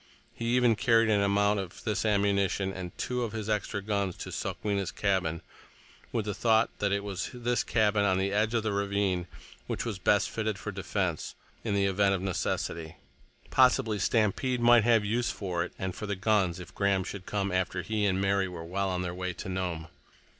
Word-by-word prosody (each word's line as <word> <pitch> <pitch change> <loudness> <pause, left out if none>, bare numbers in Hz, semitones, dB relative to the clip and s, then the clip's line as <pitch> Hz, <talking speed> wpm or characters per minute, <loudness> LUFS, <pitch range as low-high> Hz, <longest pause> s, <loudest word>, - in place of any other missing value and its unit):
He 115 - -5
even 120 -2 +4
carried 115 0 +3
an 100 -1 +3
amount 100 +1 +2
of 95 -3 -7
this 110 0 -1
ammunition 100 -2 +1
and 90 0 -7
two 125 0 -2
of 115 -2 -3
his 110 -2 -4
extra 105 -2 -1
guns 100 -3 -1
to - - -7
Sokwenna's 100 -3 -2
cabin, 95 -5 0 0.7
with 115 -3 -1
the 105 - -2
thought 110 +2 +3
that 100 -1 +1
it 100 0 0
was 95 -2 -4
this 120 -1 -1
cabin 105 -2 +2
on 95 -2 +3
the 95 +1 0
edge 110 +3 +1
of 115 - +1
the 110 -2 -1
ravine 100 -3 0 0.4
which - - -3
was 110 -5 -3
best 105 +2 +2
fitted 110 -2 -2
for 105 - -5
defense 90 -3 -2 0.3
in 105 -3 -1
the 100 0 +2
event 100 0 +3
of 95 - -4
necessity. 85 -3 -2 0.6
Possibly 125 -4 +4
Stampede 115 +5 +1
might 120 -1 +6
have 115 -3 +4
use 120 +4 0
for 90 -4 -2
it, - - -6
and 95 -1 -3
for 105 - -6
the 100 - -1
guns, 95 -3 +1
if 90 - -10
Graham 100 -2 +1
should 95 0 -7
come 100 -1 -1
after 90 0 -1
he 105 +2 0
and 95 -1 +1
Mary 100 0 +2
were 85 -3 -7
well 95 +3 -1
on 90 -1 -1
their 90 -1 -3
way 90 0 -3
to - - -8
Nome. 90 -4 -3
100 Hz, 200 wpm, -29 LUFS, 95-110 Hz, 0.7 s, might